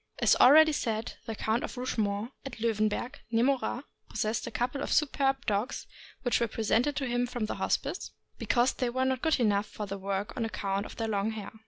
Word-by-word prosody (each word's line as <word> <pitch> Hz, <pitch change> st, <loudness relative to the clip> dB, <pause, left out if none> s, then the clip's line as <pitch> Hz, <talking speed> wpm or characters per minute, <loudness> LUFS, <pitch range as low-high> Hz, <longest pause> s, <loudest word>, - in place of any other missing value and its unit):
As -, -, +4 dB
already 310 Hz, +4 st, +8 dB
said, 225 Hz, -5 st, -2 dB
the 225 Hz, -, -3 dB
Count 220 Hz, +3 st, 0 dB
of -, -, -6 dB
Rougemont, 220 Hz, -2 st, -1 dB
at 270 Hz, -3 st, -7 dB
Loewenberg, 220 Hz, +3 st, 0 dB
near 230 Hz, 0 st, +2 dB
Morat, 265 Hz, -1 st, 0 dB, 0.3 s
possessed 215 Hz, +1 st, -1 dB
a -, -, -2 dB
couple 250 Hz, +3 st, -2 dB
of -, -, -3 dB
superb 275 Hz, -2 st, +2 dB
dogs, 210 Hz, +5 st, -1 dB, 0.4 s
which 245 Hz, -, +2 dB
were 235 Hz, -, +1 dB
presented 230 Hz, +6 st, +1 dB
to 275 Hz, -, -1 dB
him 245 Hz, 0 st, 0 dB
from 240 Hz, -3 st, -2 dB
the -, -, -4 dB
Hospice, -, -, -1 dB, 0.3 s
because 245 Hz, +1 st, +2 dB
they 250 Hz, -, -1 dB
were 260 Hz, +2 st, 0 dB
not 260 Hz, -1 st, 0 dB
good 320 Hz, -3 st, +2 dB
enough 210 Hz, -3 st, +2 dB
for 210 Hz, -, -6 dB
the 195 Hz, 0 st, -5 dB
work 195 Hz, +3 st, -3 dB
on 235 Hz, -, -1 dB
account 200 Hz, -2 st, -2 dB
of -, -, -11 dB
their 225 Hz, -, -2 dB
long 205 Hz, 0 st, 0 dB
hair. 210 Hz, -2 st, -6 dB
235 Hz, 205 wpm, -29 LUFS, 215-260 Hz, 0.4 s, already